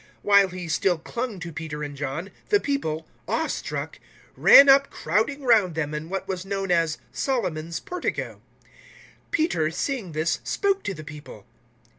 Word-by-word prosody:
003:011 - - -26 0.2
While 200 -1 +6
he 180 -1 -7
still 175 +2 +1
clung 230 +5 -5
to 170 -1 -6
Peter 150 -1 -5
and 145 -1 -6
John, 145 +7 -4 0.2
the 410 - +4
people, 165 - -2 0.2
awe - - 0
struck, - - -4 0.4
ran 280 - +8
up 275 0 +6
crowding 220 - -1
round 215 -9 +4
them 150 -2 -2
in 150 +2 -5
what 195 +1 -4
was 185 -2 -3
known 195 -1 -3
as 165 -2 +2
Solomon's 170 - -2
Portico. 360 0 -4 0.8
003:012 - - -37
Peter, 175 - +1
seeing 215 - -3
this, 155 +2 0
spoke 395 -1 0
to 195 - -2
the 155 - -9
people. 150 0 -11
180 Hz, 165 wpm, -25 LUFS, 160-240 Hz, 0.8 s, ran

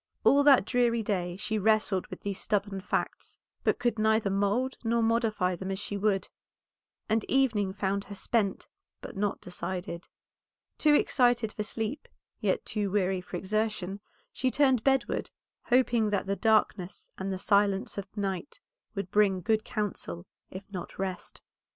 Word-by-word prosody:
All 280 - +6
that 280 -7 +6
dreary 235 -1 +2
day 180 -4 -2
she 215 +2 -1
wrestled 215 -2 +2
with - - -9
these 200 -1 -3
stubborn 205 -2 -1
facts, 185 - -3 0.3
but - - +2
could 240 -2 0
neither 220 -2 +2
mould 205 +7 +1
nor 230 0 +2
modify 225 -5 +1
them 190 +2 -6
as 190 - -2
she 205 +1 -4
would, 200 -1 +1 0.8
and 220 0 +1
evening 225 -8 +2
found 195 +1 -1
her 200 - -8
spent, 200 0 -1 0.3
but - - -9
not 205 +1 -1
decided. 180 -1 -5 0.7
Too 300 -1 +5
excited 245 -6 +3
for - - -4
sleep, 225 +6 -4 0.3
yet - - 0
too 210 -2 -1
weary 190 -2 +1
for 180 0 -6
exertion, 200 0 -2 0.3
she 260 - 0
turned 265 -4 +3
bedward, 270 -3 +1 0.4
hoping 240 -3 +3
that 200 -2 0
the 200 0 -1
darkness 210 -4 +1
and 190 +1 -2
the 190 - -2
silence 200 0 +2
of 200 - -6
night 195 - -3 0.4
would 195 -2 -4
bring 205 -3 +3
good 215 +3 +1
counsel, 180 - -4 0.2
if 190 +1 -8
not 180 -3 -7
rest. 190 -1 -4
205 Hz, 155 wpm, -29 LUFS, 190-225 Hz, 0.8 s, All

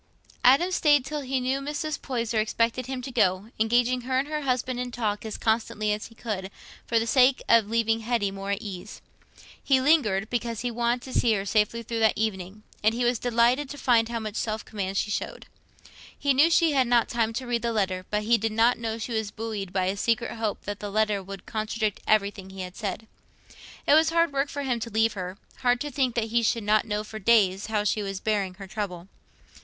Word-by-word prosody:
Adam 275 +9 +5
stayed 295 -7 +3
till 300 +1 -3
he 265 -1 -1
knew 260 +2 0
Mrs. 295 +2 -4
Poyser 235 -4 -1
expected 230 +3 0
him 260 -1 -4
to 265 - -6
go, 205 -3 +1
engaging 245 +3 +2
her 255 +1 -1
and 270 +2 0
her 305 0 -3
husband 255 -2 -1
in 250 0 -3
talk 215 -4 -2
as 220 -1 -5
constantly 220 -1 0
as 210 - -5
he 230 - -19
could, 200 -5 -4 0.4
for 235 - +2
the 225 - +2
sake 255 +2 +4
of 230 -3 +5
leaving 225 0 +1
Hetty 225 -3 0
more 195 0 -6
at 200 +3 -2
ease. 190 -4 -7 0.6
He 270 -2 +4
lingered, 260 -9 +3
because 235 -2 -2
he 245 - -2
wanted 240 +1 0
to 260 - -1
see 230 - +3
her 195 -2 -1
safely 215 +3 +1
through 230 0 -3
that 220 -1 +3
evening, 210 -1 -3 0.2
and 220 +2 +3
he 245 0 0
was 240 -1 +1
delighted 245 +3 +2
to 290 - -7
find 235 -4 +3
how 235 - -2
much 215 -1 -5
self 215 -1 -2
command 195 -2 -4
she 210 - 0
showed. - - -4 0.7
He 280 -1 +2
knew 290 +5 +5
she 335 -1 +4
had 265 -3 +2
not 240 0 +5
had 240 - -5
time 225 -1 +2
to 255 +3 -4
read 240 -1 -1
the 235 0 -1
letter, 190 -4 -1
but 210 0 -1
he 230 +2 +3
did 220 +1 -1
not 230 +3 +3
know 225 -1 -3
she 230 +1 -5
was 220 -2 -1
buoyed 210 -3 -5
up - - -20
by 185 -1 +1
a 190 +2 0
secret 230 +3 0
hope 220 -3 -3
that 205 0 -5
the 205 - -5
letter 210 -1 +1
would 195 0 -9
contradict 215 -1 -2
everything 200 -2 +1
he 190 0 -8
had 180 0 -7
said. 210 0 -4 0.8
It - - +4
was 315 +1 +5
hard 335 -2 +2
work 275 +1 0
for 285 - -4
him 250 -3 -1
to 230 - -5
leave 225 0 +2
her—hard 205 +6 -2
to 295 - -3
think 255 -3 0
that 225 -2 -1
he 235 +1 +2
should 230 0 0
not 210 +1 +3
know 210 0 -1
for 215 +1 -8
days 200 -3 +3
how 215 -2 0
she 210 +1 0
was 195 -1 -4
bearing 200 -4 -1
her 195 0 -9
trouble. 190 -3 -5
225 Hz, 230 wpm, -26 LUFS, 210-250 Hz, 0.8 s, Adam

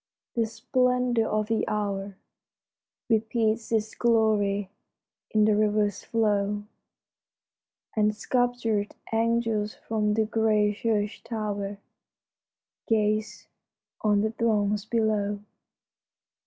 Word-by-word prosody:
The 230 -2 +1
splendor 250 0 +1
of 215 0 0
the 225 +1 0
hour 200 -2 -2 0.9
Repeats 225 0 +1
its 220 -1 0
glory 210 -4 +2 0.6
in 215 -1 +3
the 215 -1 +4
river's 210 -1 +1
flow; 205 -2 0 1.3
And 210 -1 +2
sculptured 235 -3 0 0.2
angels 225 -2 +1
from 210 -1 -1
the 220 0 +2
gray 215 -2 +2
church 210 -1 -1
tower 205 -3 -3 1.1
Gaze 215 -1 0 0.6
on 205 -1 +3
the 215 +1 0
throngs 210 -2 +1
below. 215 -3 0
215 Hz, 90 wpm, -27 LUFS, 210-225 Hz, 1.3 s, the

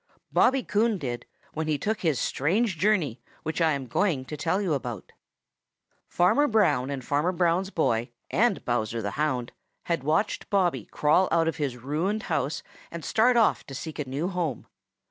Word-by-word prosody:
Bobby 265 -1 +3
Coon 215 +1 +1
did 120 -7 -5 0.3
when 160 0 -3
he 155 -1 +1
took 215 +9 -2
his 160 -6 +1
strange 185 - 0
journey 170 - +1 0.2
which 160 +2 -2
I 160 -2 +4
am 140 -2 -3
going 140 - 0
to 150 - -6
tell 165 +5 0
you 190 -6 0
about. 120 -8 -4 1.0
Farmer 185 +12 +3
Brown 150 - +2
and 135 -3 -4
Farmer 150 +5 +1
Brown's 180 +1 +1
boy 120 - 0 0.2
and 220 0 +2
Bowser 115 -1 -1
the 100 - -2
Hound 130 -3 -1 0.3
had 165 -6 -1
watched 160 +8 0
Bobby 175 - +1
crawl 155 +5 +2
out 165 0 +3
of 165 - -1
his 140 -5 -2
ruined 160 - -2
house 145 - -1 0.3
and 170 -1 -7
start 240 +2 +3
off 225 - +3
to 135 - -7
seek 155 +2 -6
a 140 -3 -3
new 145 +6 -1
home. 175 - -2
160 Hz, 175 wpm, -27 LUFS, 135-190 Hz, 1.0 s, I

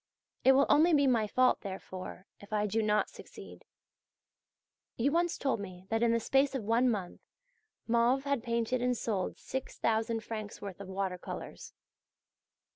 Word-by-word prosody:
It 265 - +7
will 275 +1 +5
only 320 +3 +5
be 285 -1 +4
my 235 -5 +3
fault, 255 +4 +3
therefore, 190 -1 -7
if 205 - -15
I 210 -1 +1
do 220 +2 0
not 210 0 +2
succeed. - - -12 1.3
You 265 +5 +2
once 345 +2 +1
told 270 -5 0
me 185 -2 -8
that 225 0 0
in 235 -1 +4
the 230 - +2
space 270 +4 +2
of 255 - -2
one 230 +4 +3
month 195 -6 -3 0.6
Mauve 235 +3 +2
had 280 -3 0
painted 235 +1 -1
and 250 0 +1
sold 205 -5 -2
6000 225 -3 -2
francs' 215 -2 -6
worth 200 -1 -7
of 200 - -8
water 190 -1 -3
colours. - - -8
230 Hz, 160 wpm, -31 LUFS, 205-255 Hz, 1.3 s, It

